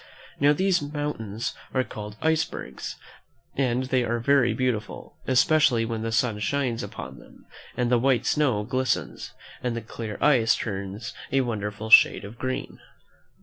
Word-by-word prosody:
Now, 145 Hz, +1 st, +5 dB
these 185 Hz, +4 st, +2 dB
moun 145 Hz, 0 st, -3 dB
tains 110 Hz, 0 st, -5 dB, 0.2 s
are 130 Hz, -, +3 dB
called 105 Hz, -3 st, -8 dB
icebergs, 160 Hz, -, -2 dB, 0.6 s
and 130 Hz, -2 st, +1 dB
they 130 Hz, -1 st, +1 dB
are 120 Hz, 0 st, -1 dB
very 125 Hz, 0 st, +3 dB
beautiful, 115 Hz, -2 st, -3 dB
especially 130 Hz, -3 st, +4 dB
when 115 Hz, -1 st, -3 dB
the 115 Hz, 0 st, -2 dB
sun 110 Hz, -2 st, +1 dB
shines 125 Hz, 0 st, -1 dB
upon 65 Hz, -1 st, -8 dB
them, -, -, -18 dB, 0.3 s
and 125 Hz, -1 st, 0 dB
the 120 Hz, -, +4 dB
white 130 Hz, -1 st, +2 dB
snow 130 Hz, -9 st, +2 dB
glistens, 130 Hz, +1 st, -2 dB, 0.3 s
and 125 Hz, -2 st, -2 dB
the 115 Hz, -, -3 dB
clear 110 Hz, -1 st, -6 dB
ice 120 Hz, -7 st, +4 dB
turns 100 Hz, +1 st, -5 dB, 0.2 s
a 135 Hz, -, +3 dB
wonderful 110 Hz, -2 st, -4 dB
shade 105 Hz, -, +7 dB
of 110 Hz, +4 st, -11 dB
green. 130 Hz, 0 st, -4 dB
120 Hz, 150 wpm, -25 LUFS, 110-135 Hz, 0.6 s, shade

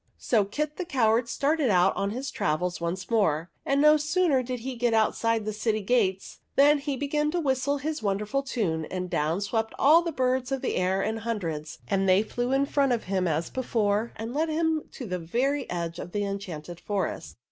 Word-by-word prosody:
So 215 Hz, -5 st, +2 dB
Kit 300 Hz, +9 st, -3 dB
the 365 Hz, -, -2 dB
Coward 240 Hz, -7 st, +2 dB
started 290 Hz, -1 st, +1 dB
out 185 Hz, -1 st, +4 dB
on 200 Hz, -, -1 dB
his 255 Hz, +6 st, -4 dB
travels 180 Hz, -6 st, -1 dB
once 180 Hz, +5 st, -3 dB
more; 170 Hz, -7 st, +1 dB, 0.2 s
and 275 Hz, 0 st, +2 dB
no 300 Hz, +1 st, +6 dB
sooner 305 Hz, -2 st, +2 dB
did 250 Hz, -1 st, -5 dB
he 260 Hz, +1 st, -4 dB
get 235 Hz, -1 st, +1 dB
outside 225 Hz, 0 st, +1 dB
the 215 Hz, -, -2 dB
city 215 Hz, 0 st, -1 dB
gates 195 Hz, -4 st, 0 dB, 0.2 s
than 290 Hz, +2 st, +5 dB
he 280 Hz, -1 st, -3 dB
began 295 Hz, +2 st, 0 dB
to 350 Hz, +3 st, -1 dB
whistle 280 Hz, -1 st, 0 dB
his 305 Hz, +2 st, -3 dB
wonderful 210 Hz, +6 st, -1 dB
tune, 195 Hz, -, -2 dB
and 180 Hz, +1 st, -5 dB
down 155 Hz, +6 st, 0 dB
swept 220 Hz, +2 st, -2 dB
all 310 Hz, +5 st, +6 dB
the 335 Hz, -1 st, -3 dB
birds 255 Hz, -2 st, 0 dB
of 270 Hz, -1 st, -2 dB
the -, -, -1 dB
air 190 Hz, +1 st, +1 dB
in 220 Hz, +1 st, -1 dB
hundreds, 170 Hz, -10 st, -4 dB
and 195 Hz, -1 st, +1 dB
they 185 Hz, +3 st, +5 dB
flew 245 Hz, +3 st, -3 dB
in 270 Hz, +1 st, +3 dB
front 280 Hz, -2 st, +2 dB
of 235 Hz, -, -1 dB
him 185 Hz, -1 st, 0 dB
as 160 Hz, +1 st, -1 dB
before 225 Hz, -3 st, 0 dB
and 225 Hz, +2 st, -5 dB
led 315 Hz, +3 st, 0 dB
him 320 Hz, 0 st, 0 dB
to 255 Hz, -, -7 dB
the 180 Hz, -3 st, -3 dB
very 255 Hz, -, -1 dB
edge 170 Hz, -1 st, -3 dB
of 175 Hz, -, -7 dB
the 205 Hz, -, 0 dB
enchanted 175 Hz, -4 st, -6 dB
forest. 195 Hz, -3 st, -3 dB
230 Hz, 205 wpm, -27 LUFS, 190-275 Hz, 0.2 s, no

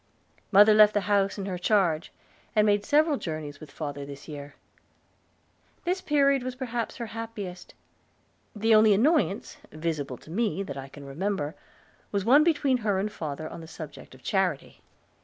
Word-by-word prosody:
Mother 210 Hz, +2 st, +8 dB
left 210 Hz, 0 st, +6 dB
the 205 Hz, -, +3 dB
house 200 Hz, 0 st, +1 dB
in 195 Hz, -, -4 dB
her 185 Hz, -2 st, -4 dB
charge, 180 Hz, -5 st, +1 dB, 0.4 s
and 210 Hz, -1 st, +5 dB
made 205 Hz, -1 st, +3 dB
several 300 Hz, +4 st, +3 dB
journeys 155 Hz, -, -5 dB
with 155 Hz, -, -11 dB
father 145 Hz, -1 st, -5 dB
this 140 Hz, 0 st, -10 dB
year. 145 Hz, -2 st, -8 dB, 1.3 s
This 370 Hz, +2 st, -1 dB
period 280 Hz, -3 st, +3 dB
was 255 Hz, 0 st, -5 dB
perhaps 240 Hz, -3 st, -3 dB
her 235 Hz, -, -4 dB
happiest. 215 Hz, -5 st, -7 dB, 0.8 s
The 225 Hz, +2 st, +3 dB
only 215 Hz, -1 st, +6 dB
annoyance, 250 Hz, -, +1 dB
visible 155 Hz, -5 st, -3 dB
to 155 Hz, -, -14 dB
me, 200 Hz, 0 st, 0 dB
that 140 Hz, -7 st, -6 dB
I 135 Hz, -1 st, -7 dB
can 140 Hz, +1 st, -12 dB
remember, 155 Hz, +1 st, -2 dB, 0.6 s
was 200 Hz, -1 st, -1 dB
one 280 Hz, +6 st, +6 dB
between 290 Hz, -5 st, +2 dB
her 210 Hz, -5 st, 0 dB
and 205 Hz, +2 st, -1 dB
father 155 Hz, -4 st, -5 dB
on 165 Hz, -, -8 dB
the 160 Hz, -, -10 dB
subject 155 Hz, -5 st, -10 dB
of 130 Hz, -, -19 dB
charity. 190 Hz, -8 st, -1 dB
200 Hz, 165 wpm, -27 LUFS, 155-225 Hz, 1.3 s, Mother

